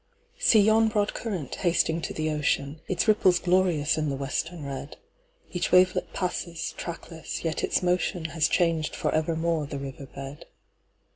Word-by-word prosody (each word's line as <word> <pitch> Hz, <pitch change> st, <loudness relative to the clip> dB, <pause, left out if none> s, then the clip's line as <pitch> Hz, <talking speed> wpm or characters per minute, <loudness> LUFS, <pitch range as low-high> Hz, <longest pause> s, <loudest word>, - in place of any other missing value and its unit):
See 220 Hz, -, +6 dB
you 220 Hz, +2 st, +4 dB
broad 210 Hz, -1 st, 0 dB
current, 185 Hz, -, -4 dB
hasting 170 Hz, -2 st, +1 dB
to -, -, -4 dB
the 155 Hz, 0 st, -1 dB
ocean, 150 Hz, 0 st, -1 dB
Its 185 Hz, +3 st, 0 dB
ripples 190 Hz, -4 st, +5 dB
glorious 175 Hz, -4 st, +2 dB
in 155 Hz, -1 st, 0 dB
the 140 Hz, -, -1 dB
western 145 Hz, +4 st, -3 dB
red:Each 180 Hz, -, -7 dB
wavelet 185 Hz, 0 st, +4 dB
passes, 175 Hz, -2 st, -3 dB
trackless; 165 Hz, -1 st, -6 dB
yet 160 Hz, -2 st, -2 dB
its -, -, +1 dB
motionHas 170 Hz, -3 st, 0 dB
changed 165 Hz, -3 st, +1 dB
for -, -, -1 dB
evermore 160 Hz, -1 st, 0 dB
the 140 Hz, -, -5 dB
river 135 Hz, 0 st, -7 dB
bed. 135 Hz, +2 st, -9 dB
165 Hz, 145 wpm, -27 LUFS, 150-185 Hz, -, See